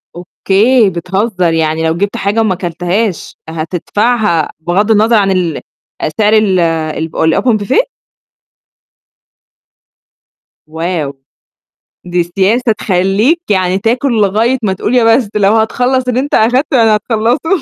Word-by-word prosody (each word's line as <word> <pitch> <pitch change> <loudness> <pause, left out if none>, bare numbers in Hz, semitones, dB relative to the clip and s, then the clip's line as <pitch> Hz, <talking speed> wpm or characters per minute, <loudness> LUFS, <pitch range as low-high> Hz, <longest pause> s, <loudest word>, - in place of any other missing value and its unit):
أوكي، 200 +6 +1
بتهزّ 190 +4 -3
يعني 160 -2 +1
لو 160 +1 -1
جبت 200 +2 -2
حاجة 205 +3 -1
وما 215 -4 0
كلتهاش 180 +3 -3
هتدفعها 175 +3 -1
بغض 185 +7 0
النظر 220 +2 +3
عن 200 -2 +2
ال 180 -4 -1 0.4
أ - - -1
سعر 215 0 +3
ال 210 -4 +3
الب 160 -1 -2
الopen 215 +8 +2
buffet؟ 445 - +2 2.8
واو! 160 -2 -3 0.9
دي 175 0 0
سياسة 200 +7 0
تخلّيك 200 - +1
يعني 185 -1 +1
تاكُل 240 +5 0
لغاية 220 +6 +1
ما 195 -3 0
تقول 210 +6 -2
يا 245 - +4
بس، 240 -6 -3
لو 205 0 +3
هتخلّص 250 +4 0
اللي 250 0 0
أنت 280 +2 -4
أخدته 255 +5 +2
يعني 225 -2 +4
هتخلّصه. 240 - 0
200 Hz, 125 wpm, -12 LUFS, 175-230 Hz, 2.8 s, يا